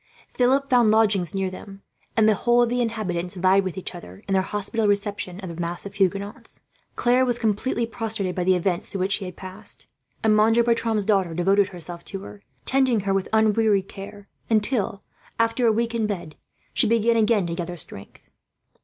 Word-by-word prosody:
Philip 265 Hz, +3 st, +2 dB
found 245 Hz, -4 st, +4 dB
lodgings 205 Hz, -5 st, +2 dB
near 190 Hz, -1 st, -1 dB
them, 195 Hz, +1 st, -11 dB, 0.3 s
and 220 Hz, -1 st, +5 dB
the 220 Hz, -, +5 dB
whole 240 Hz, +3 st, +3 dB
of 240 Hz, -, 0 dB
the 245 Hz, +1 st, 0 dB
inhabitants 190 Hz, -6 st, -2 dB
vied 190 Hz, +2 st, +3 dB
with 185 Hz, 0 st, -5 dB
each 190 Hz, -, -5 dB
other, 95 Hz, -, -11 dB
in 195 Hz, -, -1 dB
their 190 Hz, -, +4 dB
hospitable 210 Hz, +3 st, -1 dB
reception 200 Hz, -2 st, -2 dB
of 185 Hz, -, -6 dB
the 170 Hz, +1 st, -6 dB
mass 170 Hz, +2 st, -3 dB
of 200 Hz, -, -7 dB
fugitives. 200 Hz, +1 st, -2 dB, 0.3 s
Claire 245 Hz, +2 st, +3 dB
was 245 Hz, -2 st, +1 dB
completely 230 Hz, +2 st, 0 dB
prostrated 220 Hz, -4 st, -3 dB
by 180 Hz, -, -2 dB
the 185 Hz, +1 st, +3 dB
events 180 Hz, 0 st, -1 dB
through 195 Hz, -, -4 dB
which 190 Hz, +2 st, 0 dB
she 195 Hz, 0 st, 0 dB
had 180 Hz, -, -8 dB
passed, 190 Hz, -, -7 dB, 0.3 s
and 215 Hz, -1 st, +4 dB
Monsieur 225 Hz, +2 st, +4 dB
Bertram's 230 Hz, -3 st, +1 dB
daughter 190 Hz, -6 st, +1 dB
devoted 195 Hz, +3 st, +3 dB
herself 175 Hz, -2 st, -7 dB
to 195 Hz, -, -6 dB
her, 205 Hz, +1 st, -11 dB, 0.2 s
tending 260 Hz, -5 st, +3 dB
her 195 Hz, 0 st, -1 dB
with 195 Hz, -1 st, -1 dB
unwearied 220 Hz, -2 st, +3 dB
care 200 Hz, +1 st, -10 dB, 0.2 s
until, 215 Hz, -2 st, +1 dB, 0.3 s
after 230 Hz, +1 st, +2 dB
a -, -, +5 dB
week 230 Hz, +2 st, -1 dB
in 225 Hz, -2 st, 0 dB
bed, 175 Hz, -7 st, -5 dB, 0.4 s
she -, -, +3 dB
began 230 Hz, +1 st, +3 dB
again 215 Hz, -3 st, +3 dB
to 170 Hz, -, -3 dB
gather 175 Hz, 0 st, -5 dB
strength. 100 Hz, -10 st, -8 dB
205 Hz, 195 wpm, -24 LUFS, 185-225 Hz, 0.4 s, and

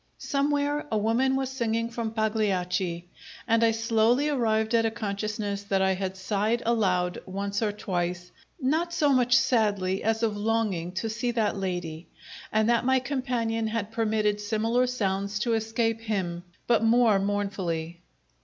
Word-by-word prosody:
Somewhere 290 Hz, +1 st, 0 dB
a 220 Hz, -, +2 dB
woman 235 Hz, +5 st, +2 dB
was 265 Hz, -1 st, -1 dB
singing 230 Hz, -3 st, -1 dB
from 230 Hz, -1 st, -3 dB
Pagliacci, 190 Hz, -5 st, -1 dB, 0.4 s
and 230 Hz, 0 st, +3 dB
I 230 Hz, -, +5 dB
slowly 230 Hz, +5 st, +2 dB
arrived 220 Hz, -5 st, +1 dB
at 230 Hz, -1 st, +4 dB
a 225 Hz, -, +2 dB
consciousness 210 Hz, -1 st, -3 dB
that 195 Hz, -1 st, +1 dB
I 190 Hz, 0 st, +3 dB
had 190 Hz, 0 st, -4 dB
sighed 210 Hz, +5 st, 0 dB
aloud 185 Hz, -6 st, +1 dB
once 200 Hz, +2 st, -3 dB
or 215 Hz, -2 st, +1 dB
twice, 180 Hz, -3 st, -3 dB, 0.3 s
not 320 Hz, +6 st, 0 dB
so 300 Hz, -3 st, +2 dB
much 250 Hz, -3 st, +4 dB
sadly, 205 Hz, -6 st, +1 dB
as 225 Hz, +1 st, 0 dB
of 220 Hz, -2 st, +1 dB
longing 205 Hz, -5 st, -1 dB
to 190 Hz, +4 st, -2 dB
see 230 Hz, +3 st, -2 dB
that 225 Hz, -3 st, 0 dB
lady, 175 Hz, -4 st, -4 dB, 0.4 s
and 215 Hz, 0 st, +2 dB
that 235 Hz, -1 st, +3 dB
my 260 Hz, +1 st, +3 dB
companion 245 Hz, -4 st, -1 dB
had 220 Hz, -1 st, -3 dB
permitted 215 Hz, -2 st, 0 dB
similar 225 Hz, +4 st, +1 dB
sounds 200 Hz, -4 st, -1 dB
to 230 Hz, +3 st, 0 dB
escape 225 Hz, 0 st, 0 dB
him, 185 Hz, -6 st, -3 dB, 0.2 s
but 235 Hz, -2 st, +3 dB
more 225 Hz, -3 st, +4 dB
mournfully. 190 Hz, -5 st, -2 dB
220 Hz, 155 wpm, -27 LUFS, 195-235 Hz, 0.4 s, I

